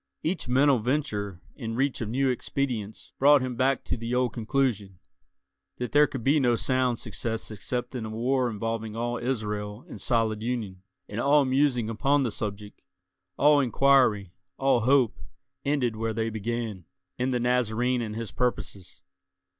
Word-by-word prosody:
Each 170 Hz, -3 st, -2 dB
mental 135 Hz, +1 st, +4 dB
venture 105 Hz, -, -2 dB
in 115 Hz, -4 st, -5 dB
reach 135 Hz, +1 st, 0 dB
of 110 Hz, -, -3 dB
new 135 Hz, +4 st, +1 dB
expedients 120 Hz, -5 st, -3 dB
brought 145 Hz, 0 st, +6 dB
him 130 Hz, -1 st, -3 dB
back 130 Hz, +1 st, +1 dB
to -, -, -2 dB
the 115 Hz, +1 st, -3 dB
old 125 Hz, -1 st, +1 dB
conclusion—that 95 Hz, -, -4 dB
there 150 Hz, 0 st, +5 dB
could 135 Hz, -5 st, -6 dB
be 145 Hz, +4 st, +4 dB
no 120 Hz, -3 st, +3 dB
sound 130 Hz, 0 st, +1 dB
success 110 Hz, +1 st, -4 dB
except 125 Hz, +4 st, -4 dB
in 120 Hz, -4 st, -4 dB
a -, -, -5 dB
war 125 Hz, +3 st, 0 dB
involving 110 Hz, 0 st, -3 dB
all 120 Hz, +1 st, -2 dB
Israel 105 Hz, -3 st, -3 dB
in -, -, -9 dB
solid 110 Hz, -3 st, +1 dB
union; 110 Hz, -6 st, -3 dB, 0.3 s
and 105 Hz, -, -5 dB
all 140 Hz, +1 st, +4 dB
musing 130 Hz, -3 st, +2 dB
upon 135 Hz, +6 st, +1 dB
the 120 Hz, -, -1 dB
subject, 105 Hz, 0 st, -6 dB, 0.6 s
all 145 Hz, +1 st, +5 dB
inquiry, 125 Hz, -7 st, +3 dB, 0.2 s
all 135 Hz, -2 st, +3 dB
hope, 125 Hz, 0 st, +3 dB, 0.4 s
ended 135 Hz, -5 st, 0 dB
where 110 Hz, 0 st, -2 dB
they 115 Hz, 0 st, -1 dB
began—in 115 Hz, +2 st, -4 dB
the 125 Hz, -1 st, 0 dB
Nazarene 125 Hz, 0 st, +1 dB
and 110 Hz, -2 st, -4 dB
his 115 Hz, -2 st, -5 dB
purposes. 100 Hz, -, -3 dB
120 Hz, 155 wpm, -27 LUFS, 110-130 Hz, 0.6 s, brought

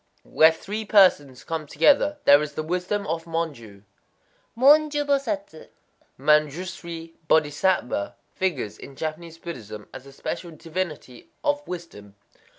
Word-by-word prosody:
_ -, -, -45 dB, 0.2 s
Where 160 Hz, +1 st, +5 dB
three 205 Hz, +7 st, -5 dB
persons 180 Hz, -, +4 dB
come 160 Hz, -2 st, -4 dB
together, 290 Hz, -, +3 dB
there 145 Hz, +1 st, +7 dB
is 150 Hz, -1 st, -4 dB
the 155 Hz, -, -3 dB
wisdom 180 Hz, +5 st, -2 dB
of 165 Hz, -1 st, -3 dB
Monjū. 145 Hz, -12 st, -5 dB, 0.7 s
Monjū 295 Hz, +3 st, +5 dB
Bosatsu 280 Hz, -, -2 dB, 0.5 s
[Mañdjus'ri 165 Hz, +3 st, 0 dB
Bodhisattva] 150 Hz, -, +1 dB, 0.2 s
figures 145 Hz, -, -2 dB
in 140 Hz, -, -11 dB
Japanese 160 Hz, +2 st, -5 dB
Buddhism 110 Hz, -, -8 dB
as 130 Hz, +1 st, -10 dB
a -, -, -12 dB
special 170 Hz, +5 st, -5 dB
divinity 160 Hz, -6 st, -6 dB
of 290 Hz, -1 st, +1 dB
wisdom. 135 Hz, -, -9 dB
165 Hz, 125 wpm, -24 LUFS, 145-190 Hz, 0.7 s, there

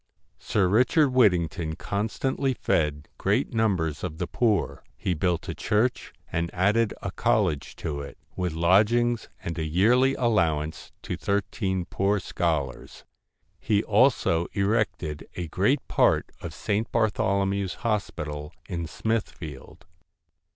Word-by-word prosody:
Sir 100 Hz, -3 st, +1 dB
Richard 130 Hz, -, +4 dB
Whittington 90 Hz, -9 st, +2 dB
constantly 125 Hz, -, -1 dB
fed 75 Hz, -6 st, 0 dB
great -, -, +1 dB
numbers 90 Hz, -9 st, 0 dB
of 75 Hz, -, -4 dB
the -, -, -2 dB
poor: 105 Hz, -, 0 dB
he 90 Hz, -, -1 dB
built 85 Hz, +1 st, -1 dB
a -, -, -3 dB
church, 110 Hz, +4 st, 0 dB, 0.2 s
and 85 Hz, 0 st, -1 dB
added 105 Hz, +4 st, +2 dB
a -, -, -3 dB
college 70 Hz, -2 st, 0 dB
to 70 Hz, -2 st, -4 dB
it, 70 Hz, -, -9 dB, 0.2 s
with 90 Hz, -3 st, -2 dB
lodgings, 110 Hz, +8 st, +3 dB
and 85 Hz, 0 st, -4 dB
a -, -, -1 dB
yearly 120 Hz, -, +3 dB
allow 105 Hz, -11 st, +2 dB
ance 75 Hz, +1 st, -7 dB
to -, -, -3 dB
thirteen 100 Hz, -2 st, -1 dB
poor 100 Hz, +2 st, 0 dB
scholars. 75 Hz, -9 st, -3 dB, 0.5 s
He 105 Hz, -1 st, +1 dB
also 105 Hz, -7 st, +3 dB
erected 100 Hz, -7 st, -1 dB
a 90 Hz, -1 st, -4 dB
great 115 Hz, -, +1 dB
part -, -, +2 dB
of -, -, -5 dB
St. 105 Hz, +2 st, -1 dB
Bartholomew's 100 Hz, -3 st, +1 dB
Hospital 75 Hz, -9 st, -2 dB
in 85 Hz, -2 st, -3 dB
Smithfield. 90 Hz, -5 st, -4 dB
95 Hz, 125 wpm, -26 LUFS, 80-110 Hz, 0.5 s, Richard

